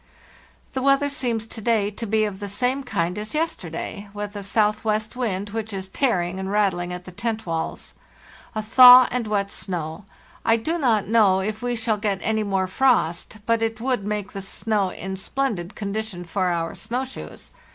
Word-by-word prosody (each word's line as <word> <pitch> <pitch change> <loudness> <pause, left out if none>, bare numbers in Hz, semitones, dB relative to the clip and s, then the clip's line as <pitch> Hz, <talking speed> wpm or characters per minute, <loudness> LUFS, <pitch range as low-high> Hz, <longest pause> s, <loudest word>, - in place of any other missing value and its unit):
"The 260 - -2
weather 275 +1 +3
seems 240 -6 -1
to 225 0 -8
day 215 -2 +1
to 230 +2 -6
be 215 +1 +2
of 205 -3 -3
the 205 - -5
same 250 +7 0
kind 180 -6 -1
as 215 +7 -5
yesterday, 205 - -3
with 205 0 -5
a 205 - -4
southwest 215 +2 0
wind, 205 -5 -2
which 220 0 -4
is 190 -1 -5
tearing 190 -7 0
and 190 0 -4
rattling 190 -4 +1
at 180 0 -6
the 185 - -9
tent 220 +3 -3
walls. 165 -1 -4 0.6
A 215 - -2
thaw 250 +2 +9
and 245 -3 -1
wet 200 -1 0
snow. 170 -2 -4 0.4
I 225 0 +4
do 320 +10 -2
not 225 -8 +2
know 210 -4 +4
if 215 +3 -3
we 245 0 -1
shall 225 -1 0
get 205 -2 -1
any 220 0 +1
more 195 -2 0
frost, 185 -4 +1
but 230 -1 +2
it 225 0 -1
would 250 -3 0
make 210 -1 -3
the 195 - -6
snow 200 0 -1
in 190 +1 -6
splendid 205 -4 -2
condition 205 -3 -4
for 185 +2 -1
our 170 -2 -1
snow 245 +4 -3
shoes. 260 - -9
210 Hz, 185 wpm, -23 LUFS, 190-230 Hz, 0.6 s, thaw